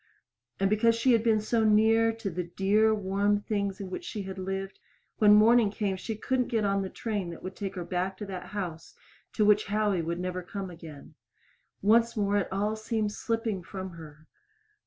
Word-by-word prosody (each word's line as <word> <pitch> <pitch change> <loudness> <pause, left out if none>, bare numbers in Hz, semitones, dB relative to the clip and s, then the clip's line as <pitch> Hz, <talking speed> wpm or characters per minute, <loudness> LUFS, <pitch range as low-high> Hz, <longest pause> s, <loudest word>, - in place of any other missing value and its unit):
And 195 - +3
because 220 +3 +3
she 240 +3 +2
had 230 -2 +4
been 225 -2 +3
so 220 +1 0
near 220 +1 +4
the 190 -6 -5
dear, 210 +3 +3
warm 205 0 +1
things 200 -2 -2
in 190 -2 -6
which 265 - -5
she 225 - -5
had 190 0 -7
lived, 195 +1 -4 0.4
when 210 -1 +7
morning 225 +1 +5
came 200 -1 -2
she 220 +4 -5
couldn't 250 +3 -1
get 220 -3 0
on 195 0 +1
the 190 - -4
train 205 -5 -3
that 170 - -9
would 185 +1 -6
take 195 -2 -5
her 180 - -4
back 185 +2 -2
to 210 - -6
that 185 -2 -7
house 175 -5 -6 0.4
to 215 - +2
which 210 0 +4
Howie 205 -3 +1
would 170 +1 -3
never 180 0 -3
come 190 +1 -6
again. 160 -4 -12 0.7
Once 230 +3 +4
more 205 -1 +1
it 200 - -1
all 205 +3 0
seemed 215 -1 -2
slipping 225 -3 -2
from 190 +1 -7
her. 155 -2 -12
205 Hz, 195 wpm, -28 LUFS, 190-220 Hz, 0.7 s, when